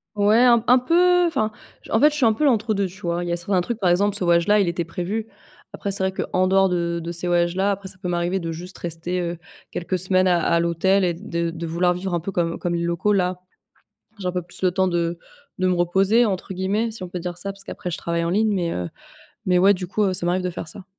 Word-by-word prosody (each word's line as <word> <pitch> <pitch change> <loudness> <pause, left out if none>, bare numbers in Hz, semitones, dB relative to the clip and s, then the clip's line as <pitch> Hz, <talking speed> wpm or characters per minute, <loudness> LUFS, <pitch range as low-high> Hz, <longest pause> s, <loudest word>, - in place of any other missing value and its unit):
Ouais, 210 +2 +4
un 235 -2 +5
un 250 - +7
peu 355 +7 +3
enfin 220 -10 0 0.4
en 225 - +2
fait, 300 +2 +6
je - - -6
suis 285 -5 +2
un 225 - +4
peu 300 - -3
l'entre-deux 215 -6 +2
tu 190 +2 -9
vois. 170 -1 -2
Il 175 - -4
y - - -1
a - - +1
certains 180 +1 0
trucs 235 +4 -4
Par 185 - +2
exemple, 200 +3 +2
ce 200 - -3
voyage 170 -1 +3
là, 210 0 +5
il 195 - +2
était 170 0 -2
prévu. 185 +6 -4 0.5
Après, 200 - -4
c'est 195 -1 +1
vrai 190 - -2
qu'en 185 0 0
dehors 195 0 +4
de 170 -1 -1
de 170 - -4
ces 170 +1 -2
voyages-là, 175 +3 +1
après 195 -1 -4
ça 185 - -13
peut 185 - -5
m'arriver 175 +2 0
de 165 -2 -4
juste 175 +3 -7
rester, 175 +2 -4
heu, 170 -1 -4 0.3
quelques 185 +2 -2
semaines 185 +1 +2
à 175 -1 +3
à 170 - +2
l'hôtel 170 +4 +2
et 175 -2 +1
de 170 -2 -3
de 165 0 -6
vouloir 175 +2 +1
vivre 185 +1 -4
un 175 - +1
peu 185 +4 -5
comme 170 -2 -1
comme 175 -1 -1
les 170 - -1
locaux. 170 +4 0
Là, 180 -2 0 0.8
j'ai 185 - -6
un 180 - 0
peu 180 -1 -2
plus 175 - -15
le 185 - +3
temps 190 +1 +1
de 170 -1 -1 0.4
de 185 - +1
«me 180 - +2
reposer» 195 +7 +3
entre 190 -2 -2
guillemets, 200 +5 -1
si 220 -3 -10
on 180 - -5
peut 180 - -5
dire 175 0 -5
ça, 195 +2 -4
parce 195 0 -10
qu'après 180 - -6
je - - -4
travaille 170 0 -2
en 170 - -1
ligne. 215 +3 +2
Mais, 175 -3 -1
heu, 90 -1 -3 0.6
mais 180 -1 +3
ouais, 195 +3 +5
du 180 -1 -6
coup, 210 +2 0
heu, 190 - +1
ça 175 - -3
m'arrive 180 +2 +1
de 180 - -2
faire 170 -2 -7
ça. 190 +3 -10
180 Hz, 275 wpm, -22 LUFS, 175-200 Hz, 0.8 s, un